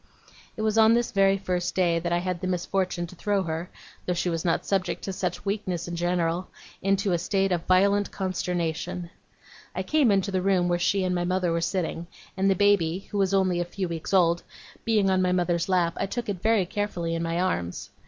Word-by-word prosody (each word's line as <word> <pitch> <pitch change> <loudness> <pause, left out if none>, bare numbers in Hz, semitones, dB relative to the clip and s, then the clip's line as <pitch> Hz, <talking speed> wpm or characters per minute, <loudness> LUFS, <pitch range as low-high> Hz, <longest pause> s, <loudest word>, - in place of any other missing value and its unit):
It 215 - -2
was 220 0 +2
on 220 +1 +6
this 240 0 0
very 195 -2 +4
first 180 -2 -2
day 175 -3 +2
that 170 +1 -3
I 175 - +3
had 180 -1 -3
the 185 - -2
misfortune 180 0 -1
to 180 +2 -12
throw 200 +1 0
her, 165 +1 -4 0.4
though 180 - +1
she 175 +1 0
was 165 -1 -2
not 170 - 0
subject 195 -2 -1
to 195 - -3
such 180 -1 -3
weakness 190 -4 -2
in 175 - -4
general, 175 0 0 0.3
into 195 +1 +1
a 175 - +1
state 195 +2 0
of 170 -2 -1
violent 200 +2 +3
consternation. 180 -2 -3 0.6
I - - -1
came 300 -6 +3
into 200 -1 +2
the 185 -1 0
room 185 -2 +2
where 175 0 +1
she 190 +2 +1
and 185 0 0
my 175 -1 0
mother 180 -1 0
were 165 0 0
sitting; 170 -1 -2 0.3
and 195 +1 +2
the 195 - +3
baby 190 -2 +2
(who 205 - -1
was 195 -1 +2
only 185 -2 +2
a - - +1
few 185 +2 -4
weeks 165 -1 -5
old) 170 -3 +4 0.4
being 210 -4 +3
on 185 0 +2
my 180 0 +2
mother's 175 -1 0
lap, 175 -3 +2
I 195 - -1
took 240 +3 -4
it 190 -4 -3
very 220 -4 +3
carefully 175 -4 -2
in 165 - -2
my 170 +1 -1
arms. 95 - -2
185 Hz, 220 wpm, -26 LUFS, 175-195 Hz, 0.6 s, on